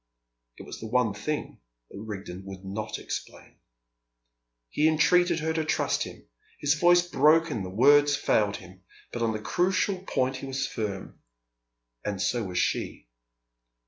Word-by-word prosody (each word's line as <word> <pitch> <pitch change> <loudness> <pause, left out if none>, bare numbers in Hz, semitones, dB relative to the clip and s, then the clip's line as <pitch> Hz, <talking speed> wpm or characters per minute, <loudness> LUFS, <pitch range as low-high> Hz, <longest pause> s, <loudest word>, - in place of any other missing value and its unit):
It - - -9
was - - -8
the 110 - -6
one 120 -2 +1
thing 145 +9 -4 0.3
that 100 - -8
Rigden 95 -3 -7
would 95 0 -9
not 100 +3 -4
explain. - - -8 1.1
He 150 - +2
entreated 170 +2 +3
her 160 +1 -1
to 160 -1 0
trust 155 - 0
him. - - -12 0.3
His 145 0 +2
voice 175 +3 +5
broke 165 -1 +4
and 110 -8 -3
the 95 - -5
words 145 +8 +5
failed 105 -7 +1
him. 95 0 -14 0.3
But 120 - -4
on 115 -1 +1
the 110 - -3
crucial 185 - 0
point 130 0 0
he 135 - -7
was 135 0 -2
firm. 105 -7 -5 0.8
And 100 -2 -3
so 115 +3 0
was 90 -1 -5
she. - - -1
125 Hz, 155 wpm, -27 LUFS, 100-155 Hz, 1.1 s, voice